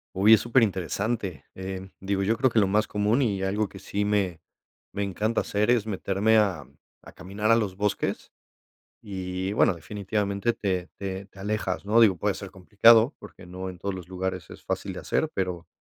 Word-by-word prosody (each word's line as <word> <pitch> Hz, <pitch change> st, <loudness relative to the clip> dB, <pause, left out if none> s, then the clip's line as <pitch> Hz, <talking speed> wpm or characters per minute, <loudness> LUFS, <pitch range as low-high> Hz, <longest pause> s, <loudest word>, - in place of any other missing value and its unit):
Uy, 105 Hz, +4 st, +6 dB
es 105 Hz, -, +6 dB
superinteresante, 105 Hz, -, 0 dB
eh, 95 Hz, 0 st, -6 dB
digo, 95 Hz, 0 st, -1 dB
yo 110 Hz, +4 st, +2 dB
creo 130 Hz, +2 st, +2 dB
que 115 Hz, -, +2 dB
lo 100 Hz, -, +3 dB
más 105 Hz, +2 st, +2 dB
común 105 Hz, +5 st, +1 dB
y 100 Hz, -6 st, 0 dB
algo 100 Hz, +1 st, 0 dB
que 95 Hz, -, -11 dB
sí 100 Hz, +1 st, -2 dB
me 100 Hz, -5 st, 0 dB, 0.5 s
me 100 Hz, +1 st, -2 dB
encanta 105 Hz, +4 st, -1 dB
hacer 105 Hz, +3 st, +1 dB
es 120 Hz, -4 st, +2 dB
meterme 105 Hz, +2 st, +1 dB
a 105 Hz, -3 st, +1 dB, 0.4 s
a -, -, -13 dB
caminar 100 Hz, +4 st, -3 dB
a 115 Hz, -, +7 dB
los 105 Hz, -5 st, -1 dB
bosques 100 Hz, -1 st, -2 dB, 0.7 s
y, 95 Hz, -1 st, -4 dB
bueno, 105 Hz, -, +4 dB
definitivamente 100 Hz, +4 st, -2 dB
te 95 Hz, -5 st, -2 dB
te 95 Hz, 0 st, -5 dB
te 95 Hz, -, -19 dB
alejas, 100 Hz, -2 st, -2 dB
¿no?, 110 Hz, +3 st, +4 dB
digo, 105 Hz, -5 st, +6 dB
puede 100 Hz, +4 st, 0 dB
ser 100 Hz, -2 st, -8 dB
complicado 110 Hz, -, +5 dB
porque 90 Hz, -, -13 dB
no 90 Hz, +1 st, -6 dB
en 90 Hz, -, -11 dB
todos 100 Hz, +2 st, -3 dB
los 90 Hz, -2 st, -9 dB
lugares 95 Hz, 0 st, -4 dB
es -, -, -12 dB
fácil -, -, -3 dB
de -, -, -7 dB
hacer, 160 Hz, -, -1 dB
pero, 90 Hz, -3 st, -3 dB
100 Hz, 190 wpm, -26 LUFS, 95-110 Hz, 0.7 s, a